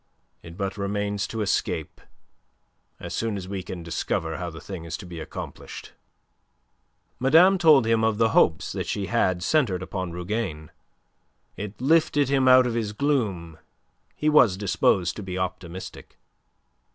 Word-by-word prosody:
It 85 Hz, +1 st, -12 dB
but 100 Hz, 0 st, -3 dB
remains 100 Hz, 0 st, -2 dB
to 110 Hz, -, -4 dB
escape, 100 Hz, -, -2 dB, 1.0 s
as -, -, -7 dB
soon 110 Hz, -3 st, -2 dB
as 95 Hz, -1 st, -7 dB
we 95 Hz, 0 st, -4 dB
can 90 Hz, -1 st, -7 dB
discover 80 Hz, -1 st, -2 dB
how 90 Hz, -1 st, -4 dB
the 80 Hz, -1 st, -10 dB
thing 95 Hz, -4 st, -8 dB
is 85 Hz, 0 st, -5 dB
to 100 Hz, -, -10 dB
be 85 Hz, -2 st, -8 dB
accomplished." 80 Hz, -, -8 dB, 1.3 s
Madame 165 Hz, +9 st, +5 dB
told 155 Hz, -7 st, +6 dB
him 115 Hz, 0 st, +2 dB
of 110 Hz, -1 st, +1 dB
the 115 Hz, 0 st, +3 dB
hopes 80 Hz, -7 st, +2 dB
that -, -, -4 dB
she 100 Hz, -, -2 dB
had 95 Hz, -5 st, 0 dB
centred 105 Hz, -, +1 dB
upon 95 Hz, -2 st, -4 dB
Rougane. 90 Hz, -3 st, -4 dB, 0.8 s
It 105 Hz, 0 st, -7 dB
lifted 145 Hz, 0 st, +2 dB
him 135 Hz, -2 st, +2 dB
out 130 Hz, 0 st, +7 dB
of 120 Hz, -, -1 dB
his 110 Hz, -3 st, -2 dB
gloom. 105 Hz, -, -1 dB, 0.6 s
He 150 Hz, -, -2 dB
was 125 Hz, -11 st, +5 dB
disposed 95 Hz, -3 st, +1 dB
to -, -, -5 dB
be 95 Hz, -2 st, -5 dB
optimistic. 90 Hz, 0 st, -6 dB
100 Hz, 150 wpm, -25 LUFS, 90-120 Hz, 1.3 s, out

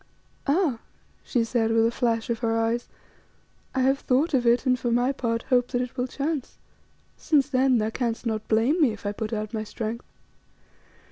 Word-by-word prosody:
"Ah!" 290 Hz, -5 st, +2 dB, 0.4 s
she 240 Hz, -, 0 dB
said, 225 Hz, -1 st, 0 dB
with 225 Hz, 0 st, +4 dB
a 230 Hz, -, +2 dB
flash 230 Hz, -2 st, 0 dB
of 230 Hz, -, -2 dB
her 225 Hz, -1 st, 0 dB
eyes. 225 Hz, +1 st, -1 dB, 0.9 s
"I 260 Hz, -, +2 dB
have 270 Hz, +1 st, +3 dB
thought 285 Hz, +6 st, +1 dB
of 245 Hz, -3 st, +2 dB
it, 240 Hz, +3 st, +3 dB
and 255 Hz, -1 st, +2 dB
for 240 Hz, -, -1 dB
my 245 Hz, +3 st, +2 dB
part 230 Hz, -3 st, -2 dB
hope 245 Hz, -2 st, +2 dB
that 245 Hz, -1 st, -1 dB
it 250 Hz, -, -8 dB
will 250 Hz, -1 st, -1 dB
chance, 285 Hz, +1 st, -3 dB, 0.6 s
since 290 Hz, -4 st, +2 dB
then 260 Hz, -2 st, +3 dB
thou 220 Hz, 0 st, 0 dB
canst 235 Hz, 0 st, -2 dB
not 220 Hz, -2 st, -2 dB
blame 235 Hz, +10 st, +2 dB
me 255 Hz, -7 st, +4 dB
if 215 Hz, -, -12 dB
I 205 Hz, -, 0 dB
put 215 Hz, +1 st, -5 dB
out 215 Hz, -1 st, -3 dB
my 220 Hz, -1 st, -2 dB
strength. 225 Hz, +2 st, -5 dB
240 Hz, 195 wpm, -25 LUFS, 225-260 Hz, 0.9 s, with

